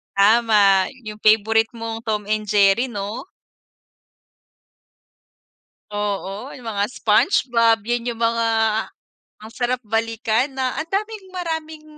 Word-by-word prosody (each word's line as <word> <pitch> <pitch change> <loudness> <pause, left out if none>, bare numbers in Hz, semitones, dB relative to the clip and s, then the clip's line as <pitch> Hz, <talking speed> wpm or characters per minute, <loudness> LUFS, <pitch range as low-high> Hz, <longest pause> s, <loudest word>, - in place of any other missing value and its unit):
Tama, 205 -1 +4
yung 210 0 -7
favorite 220 +1 +3
mong, 230 0 -6
"Tom 210 -1 -2
and 215 0 0
Jerry" 205 +3 +3
'no? 210 - -5 2.7
Oo, 205 +3 -4
yung 245 -3 -11
mga 205 -1 0
"Spongebob" 230 - +2
yun 240 +1 -2
yung 230 - -12
mga, 230 0 +1 1.0
ang 220 - -10
sarap 250 +1 -2
balikan 225 +4 -1
na 260 +2 -2
ang 320 - -4
daming 420 +1 -3
maraming, 320 -3 -4
225 Hz, 110 wpm, -21 LUFS, 210-250 Hz, 2.7 s, Tama